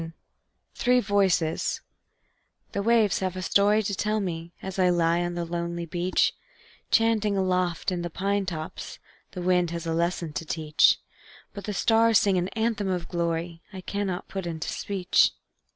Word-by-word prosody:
The 165 0 -7 0.6
Three 250 +1 +3
Voices 195 -7 +1 0.9
The 200 - -2
waves 220 -2 +3
have 185 -1 -2
a 185 - -4
story 205 +3 +3
to 200 - -2
tell 210 +2 0
me, 170 -3 -4
As 190 0 -6
I 180 -1 +4
lie 170 -1 +2
on 175 0 -2
the 175 -1 -2
lonely 170 0 -3
beach; 175 +2 +1 0.6
Chanting 220 -3 +2
aloft 185 -1 0
in 180 -1 -2
the 175 - -3
pine 195 +3 -1
tops, 160 -3 -6 0.4
The 180 - -5
wind 180 -1 +2
has 170 0 -5
a 165 - -1
lesson 170 -1 -1
to 165 - -3
teach; 155 -1 +3 0.6
But 200 - -7
the 210 - -3
stars 225 +3 +4
sing 195 -3 +3
an 175 - -1
anthem 220 -2 0
of 180 -2 -2
glory 170 -1 -2
I 190 -2 -8
cannot 195 -1 -3
put 190 -3 -5
into 160 -2 -4
speech. 195 -3 +2
180 Hz, 170 wpm, -26 LUFS, 170-200 Hz, 0.9 s, I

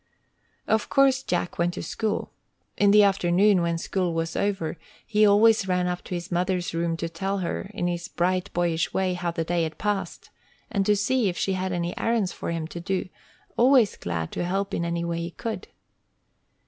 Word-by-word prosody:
Of 220 -1 +1
course 270 -1 +4
Jack 175 -8 -2
went 175 0 +1
to - - -5
school. 220 -2 -2 0.4
In 205 - +4
the 210 +1 +7
afternoon, 195 0 +3
when 170 -1 0
school 175 0 -1
was 165 0 -2
over, 195 -5 -1 0.3
he 215 -1 +4
always 215 0 +5
ran 180 -1 +1
up 180 0 -2
to 180 - -4
his 175 +1 -6
mother's 180 0 0
room 165 0 -1
to 165 - -3
tell 190 +4 -3
her, 190 - -4
in 175 - -1
his 175 0 -2
bright, 185 +2 -1
boyish 170 -2 0
way, 190 -1 +1
how 175 -1 -2
the 165 -1 -2
day 170 +1 0
had 160 -1 -3
passed, 205 -2 -3 0.4
and 200 -4 0
to 210 - +5
see 220 +2 +1
if 175 - -5
she 195 - 0
had 185 0 -2
any 175 -1 -2
errands 225 -5 +1
for - - -5
him 165 -1 -2
to 170 - -6
do, 185 +1 -2 0.5
always 245 -4 +5
glad 85 -2 -4
to - - -3
help 195 +3 -2
in 170 - -1
any 170 0 -2
way 170 0 -2
he 170 0 -3
could. 220 +5 -5
180 Hz, 200 wpm, -25 LUFS, 170-205 Hz, 0.5 s, the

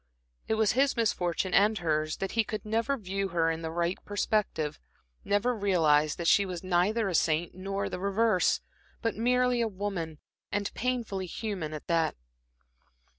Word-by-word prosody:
It 220 - +1
was 220 -2 +3
his 270 +1 +2
misfortune 185 -5 0
and 210 +2 +4
hers, 155 -3 0
that 195 - -3
he 225 - +2
could 215 -2 -5
never 230 +6 0
view 195 -2 -2
her 165 -2 +1
in 165 0 -4
the 160 - -3
right 170 +2 -2
perspective, 200 -7 -1 0.4
never 205 +5 +1
realize 160 -8 +3
that 170 - -5
she 200 - +6
was 180 -3 -5
neither 190 +5 +2
a 190 - -2
saint 165 +1 +1
nor 195 +2 -3
the - - -5
reverse, 200 0 +2 0.4
but 230 - 0
merely 250 +1 +2
a 230 - +2
woman, 185 -6 -4 0.3
and 205 -1 -2
painfully 230 -7 -2
human 185 -5 -4
at 155 -1 -7
that. 165 -2 +1
195 Hz, 165 wpm, -29 LUFS, 170-220 Hz, 0.4 s, she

